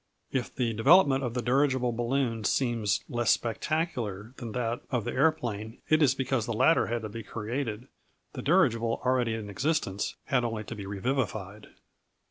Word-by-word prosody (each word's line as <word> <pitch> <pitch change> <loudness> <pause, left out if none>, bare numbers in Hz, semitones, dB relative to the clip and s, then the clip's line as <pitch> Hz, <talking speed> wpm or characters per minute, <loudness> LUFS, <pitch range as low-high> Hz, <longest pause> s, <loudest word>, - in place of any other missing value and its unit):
If 130 -3 -2
the 120 -3 0
development 135 - +5
of 120 -1 -3
the 125 - -1
dirigible 130 -1 +2
balloon 120 -1 -1
seems 115 -2 +1
less 120 -1 -1
spectacular 115 - -1
than 115 -3 -6
that 120 -1 -2
of 125 -4 0
the - - -2
aeroplane, 120 -7 0
it 155 0 +4
is 135 -3 +4
because 130 -3 -1
the 115 - -1
latter 160 +9 +4
had 120 -1 -2
to 110 - -4
be 115 +2 -6
created; 115 +2 -4 0.5
the - - -5
dirigible, 120 -9 +2
already 125 -3 +2
in 110 -2 -6
existence, 105 -2 -1
had 135 -4 +1
only 115 -2 -2
to 110 - -7
be 100 -2 -7
revivified. 105 -2 -3
120 Hz, 165 wpm, -28 LUFS, 110-135 Hz, 0.5 s, development